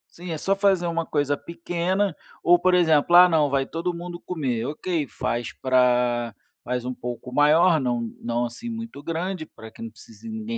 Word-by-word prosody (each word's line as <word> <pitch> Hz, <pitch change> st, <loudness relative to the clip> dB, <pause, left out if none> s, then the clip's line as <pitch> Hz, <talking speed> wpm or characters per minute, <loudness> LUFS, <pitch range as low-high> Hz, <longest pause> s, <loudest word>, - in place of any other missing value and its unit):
Sim, 175 Hz, 0 st, -7 dB
é 160 Hz, -, -2 dB
só 195 Hz, +5 st, 0 dB
fazer 195 Hz, -3 st, +2 dB
uma 165 Hz, -1 st, -1 dB
coisa 145 Hz, -1 st, 0 dB
pequena, 175 Hz, +4 st, -2 dB, 0.3 s
ou, 175 Hz, +1 st, +5 dB
por 185 Hz, +1 st, +2 dB
exemplo, 165 Hz, -2 st, +3 dB
ah, 180 Hz, -, +9 dB
não, 155 Hz, -4 st, +2 dB
vai 135 Hz, -1 st, +1 dB
todo 170 Hz, +4 st, -3 dB
mundo 175 Hz, 0 st, -7 dB
comer, 135 Hz, -11 st, -3 dB
ok, 155 Hz, +2 st, -2 dB
faz 120 Hz, 0 st, -3 dB
pra 125 Hz, -3 st, +1 dB, 0.3 s
faz 125 Hz, 0 st, -3 dB
um 130 Hz, -, -3 dB
pouco 125 Hz, +1 st, -7 dB
maior, 155 Hz, +2 st, +4 dB
não 120 Hz, -2 st, 0 dB, 0.2 s
não 120 Hz, +1 st, -1 dB
assim 175 Hz, -, -7 dB
muito 225 Hz, -11 st, -7 dB
grande 170 Hz, +1 st, -3 dB
pra 110 Hz, -, -13 dB
que 110 Hz, -, -15 dB
não 115 Hz, -, -5 dB
precise 115 Hz, -, -13 dB
ninguém 220 Hz, +1 st, -4 dB
160 Hz, 185 wpm, -24 LUFS, 125-180 Hz, 0.3 s, ah